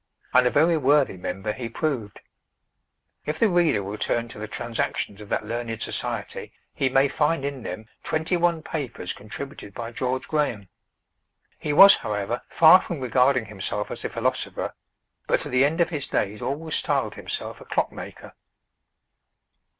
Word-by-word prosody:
And 125 0 +6
a - - +4
very 165 +4 +3
worthy 140 -5 +3
member 95 +3 -4
he 120 0 -5
proved. 120 -6 -3 1.1
If 150 +1 -1
the 225 - +3
reader 170 - +2
will 100 +2 -6
turn 120 0 0
to 105 - -9
the 110 - -5
Transactions 110 -2 -3
of 105 - -11
that - - -1
learned 115 0 -4
society, - - -2 0.2
he 135 - +1
may 135 +2 +4
find 150 +1 0
in 140 -2 -4
them 105 +1 -6 0.2
twenty 160 +3 0
one 170 -2 +1
papers 130 - -4
contributed 110 0 -9
by 115 -1 -5
George 130 +2 -2
Graham. 120 - -1 0.9
He 150 - -2
was, 195 +7 +9
however, 105 +3 -3
far 170 +3 +7
from 170 -5 -5
regarding 125 0 +2
himself 105 0 -3
as - - -5
a - - -2
philosopher, - - -1 0.5
but - - +2
to - - +1
the 130 +1 +3
end 155 +5 +1
of 170 -1 +3
his 150 -5 -3
days 105 +1 -1
always 155 +3 -3
styled - - +1
himself - - -5
a - - -11
clock - - 0
maker. - - -10
130 Hz, 165 wpm, -24 LUFS, 110-155 Hz, 1.1 s, was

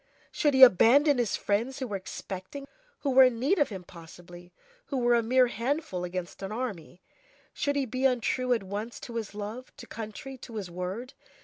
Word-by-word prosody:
Should 295 -3 +1
he 265 - +8
abandon 260 - +6
his 235 -4 0
friends 230 +6 -1
who 265 - -3
were 210 -5 -4
expecting 190 +6 -7
him? - - -13 0.3
Who 280 - 0
were 260 0 +8
in 250 -2 +1
need 305 +10 +2
of 290 - +3
him 190 -4 -7
possibly! 175 +1 -13 0.4
who 275 - -3
were 240 -1 +3
a 235 - +4
mere 250 +3 +4
handful 240 - -2
against 180 +1 -5
an 195 +1 -5
army! 200 -7 -6 0.5
Should 285 -1 -1
he 280 -1 +1
be 255 +2 -2
untrue 255 0 +1
at 230 - -1
once 205 +5 -5
to 235 -1 -6
his 215 -3 -5
love, 215 +5 -7
to - - -10
country, 230 +5 -8
to 235 -2 -10
his 195 -5 -5
word? 190 +9 -5
235 Hz, 200 wpm, -28 LUFS, 195-260 Hz, 0.5 s, he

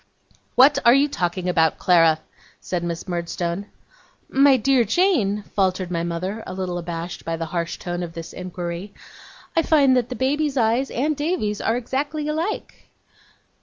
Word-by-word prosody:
'What 280 +2 +6
are 235 +2 +7
you 280 +2 +4
talking 180 -7 -2
about, 160 -3 +2
Clara?' 165 -3 +4 0.4
said 175 -2 -3
Miss 170 +1 -4
Murdstone. 175 +2 -3 0.6
'My 275 0 +5
dear 260 +1 +3
Jane,' 220 - +1
faltered 185 -2 0
my 170 -1 -1
mother, 175 +6 -3
a - - -6
little 180 -2 -3
abashed 170 0 -6
by 165 0 -3
the 165 - -3
harsh 170 -1 -2
tone 175 0 -4
of 170 -2 -5
this 165 0 -8
inquiry, 180 +1 -6 0.6
'I 330 - +5
find 290 -5 +4
that 250 -2 +1
the 255 - -4
baby's 280 +3 0
eyes 235 +3 +2
and 295 +5 0
Davy's 290 - -1
are 225 - +1
exactly 285 +5 -3
alike. 325 +7 -4
200 Hz, 160 wpm, -22 LUFS, 175-270 Hz, 0.6 s, are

